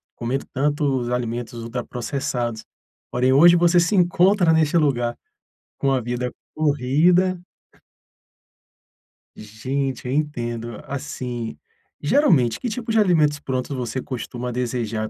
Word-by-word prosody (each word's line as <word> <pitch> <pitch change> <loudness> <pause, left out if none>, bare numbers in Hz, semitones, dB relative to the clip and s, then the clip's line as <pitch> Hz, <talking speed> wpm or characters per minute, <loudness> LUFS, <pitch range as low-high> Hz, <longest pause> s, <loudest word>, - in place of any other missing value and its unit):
comendo 125 +3 -3
tanto 145 +2 0 0.2
os 120 -1 -3
alimentos 120 -1 -3
ultraprocessados?”. 120 -1 -3 0.5
Porém, 125 +1 +2
hoje 170 +5 +7
você 175 +1 +4
se 170 +4 +2
encontra 180 0 +4
neste 160 0 +3
lugar, 120 -6 +1 0.6
com 135 - +1
a 135 - +2
vida 125 +1 -3 0.2
corrida. 155 +6 +2 2.0
Gente, 130 +5 -4
eu 125 - -2
entendo. 120 -6 -3
Assim, 125 - -5 0.4
geralmente, 145 - +3
que 245 - -3
tipos 225 0 -4
de 220 - +6
alimentos 155 -7 +3
prontos 130 0 -3
você 125 0 -3
costuma 125 -1 -5
desejar? 115 -3 -2
130 Hz, 115 wpm, -22 LUFS, 120-155 Hz, 2.0 s, hoje